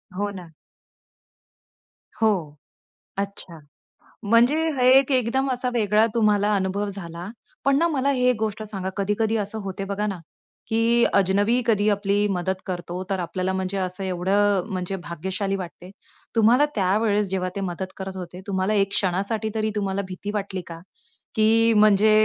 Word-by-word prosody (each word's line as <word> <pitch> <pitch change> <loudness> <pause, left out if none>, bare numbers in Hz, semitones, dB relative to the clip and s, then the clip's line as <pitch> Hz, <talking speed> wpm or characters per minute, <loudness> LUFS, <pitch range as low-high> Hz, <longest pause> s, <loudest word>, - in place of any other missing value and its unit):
हो 205 +1 -1
ना. 180 -4 -10 1.7
हो, 180 -9 +1 0.6
अच्छा. 195 -4 -5 0.6
म्हणजे 230 +6 +4 0.2
हे 250 - +4
एक 275 +1 -2
एकदम 260 +1 +1
असा 250 0 -1
वेगळा 215 -1 +3
तुम्हाला 210 -2 +3
अनुभव 195 +1 -1
झाला. 175 -3 -7 0.4
पण 275 0 +4
ना 335 +3 +3
मला 280 -3 0
हे 250 -2 +2
एक 250 - +2
गोष्ट 215 0 -2
सांगा 195 -3 -5
कधी-कधी 210 +3 0
असं 210 +1 -2
होते 195 0 -5
बघा 200 +1 -2
ना 195 -3 -4 0.5
की 230 +1 +3
अजनबी 200 +5 +3
कधी 210 -2 +2
आपली 205 0 +1
मदत 190 -1 -2
करतो. 180 0 -4
तर 195 - -1
आपल्याला 185 +2 -2
म्हणजे 190 +1 -2
असं 185 0 -3
एवढं 190 +2 +1
म्हणजे 185 0 -3
भाग्यशाली 190 +4 -3
वाटते. 180 -1 -8 0.5
तुम्हाला 235 +6 +5
त्यावेळेस 205 +1 +2
जेव्हा 185 -1 -1
ते 200 - -3
मदत 185 0 -4
करत 190 0 -6
होते, 180 0 -8
तुम्हाला 190 +1 0
एक 195 -1 +2
क्षणासाठी 200 +4 -1
तरी 215 0 0
तुम्हाला 200 -1 -1
भीती 190 +2 -6
वाटली 195 -2 -3
का? 165 -1 -8 0.6
की 225 +1 +4
म्हणजे 210 0 +5
200 Hz, 150 wpm, -24 LUFS, 190-220 Hz, 1.7 s, तुम्हाला